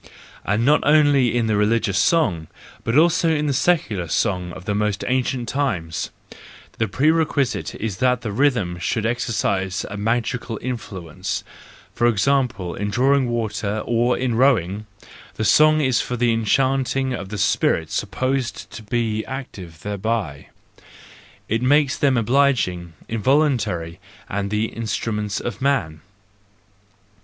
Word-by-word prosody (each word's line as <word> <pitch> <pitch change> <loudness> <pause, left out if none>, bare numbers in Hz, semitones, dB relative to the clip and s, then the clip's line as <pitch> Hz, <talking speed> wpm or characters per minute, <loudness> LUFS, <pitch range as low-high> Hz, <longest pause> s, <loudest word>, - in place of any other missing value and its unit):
—And 105 +4 0
not 150 +3 +5
only 145 -5 +4
in 120 - +1
the 110 -1 +1
religious 105 -1 +1
song, 105 - +2 0.4
but 115 +4 +1
also 165 +1 +4
in 150 -2 +1
the 145 - +1
secular 130 - +1
song 90 0 -1
of 90 - -10
the 105 - -1
most 105 -1 -1
ancient 130 -1 -1
times 90 - -2 0.7
the 110 - +1
prerequisite 140 -3 +1
is 105 -4 -4
that 125 -1 +2
the 110 -4 -4
rhythm 105 -8 +1
should 110 +4 -1
exercise 100 -5 -1
a 100 - -5
magical 115 +2 -1
influence; 100 -10 -5 0.5
for 120 - +2
example, 115 -5 +1
in 105 +1 -3
drawing 130 +3 +2
water, 110 -2 -2
or 120 +1 +1
in 125 -2 -1
rowing: 110 -5 +2 0.5
the 110 - -2
song 155 +5 +5
is 130 -4 +2
for 125 - -4
the 120 -1 +2
enchanting 130 +3 +1
of 100 -6 -5
the 105 - -5
spirits 100 - +1
supposed 130 -1 -2
to - - -8
be 110 0 -1
active 100 - -8
thereby; 105 -7 -3 1.0
it 115 +2 0
makes 140 +1 +3
them 135 -3 +2
obliging, 115 -9 +1
involun¬ 135 +5 +2
tary, 85 -5 -4 0.3
and 100 0 -3
the 105 +1 0
instruments 105 -2 -3
of 120 - -5
man. 125 - 0
115 Hz, 135 wpm, -21 LUFS, 100-130 Hz, 1.0 s, not